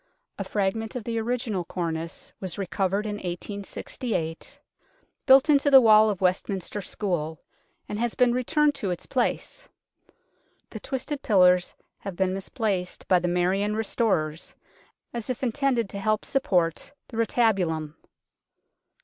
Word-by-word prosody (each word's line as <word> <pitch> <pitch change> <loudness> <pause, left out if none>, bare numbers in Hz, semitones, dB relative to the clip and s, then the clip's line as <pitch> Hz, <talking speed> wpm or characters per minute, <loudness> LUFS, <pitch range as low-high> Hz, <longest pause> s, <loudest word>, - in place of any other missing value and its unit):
A - - -1
fragment 205 +3 -2
of 250 - -4
the 230 +1 -2
original 225 -5 -2
cornice 165 -1 -5
was 185 -3 -5
recovered 195 +1 -1
in 205 -1 -3
1868, 180 -1 -5 0.7
built 265 +2 +7
into 285 -1 +4
the 270 -1 +10
wall 220 -2 +6
of 195 -3 -3
Westminster 190 +2 -1
School, 170 -6 -3 0.5
and 210 - -4
has 235 -1 -1
been 250 -1 +4
returned 295 +4 +2
to 205 -8 -3
its 180 - -4
place. - - -2 1.0
The - - -6
twisted 275 +1 -4
pillars 180 -3 +4 0.2
have 195 -3 -6
been 185 0 +1
mis 195 0 -6
placed 200 -7 -2
by 185 - +5
the 175 - -2
Marian 185 +4 +1
restorers 195 -8 -1 0.6
as 235 0 -5
if 255 +1 -3
intended 250 -2 +1
to 200 - -5
help 215 +1 0
support 180 - 0 0.2
the 225 - -8
retabulum. 190 -10 +1
205 Hz, 135 wpm, -26 LUFS, 180-235 Hz, 1.0 s, the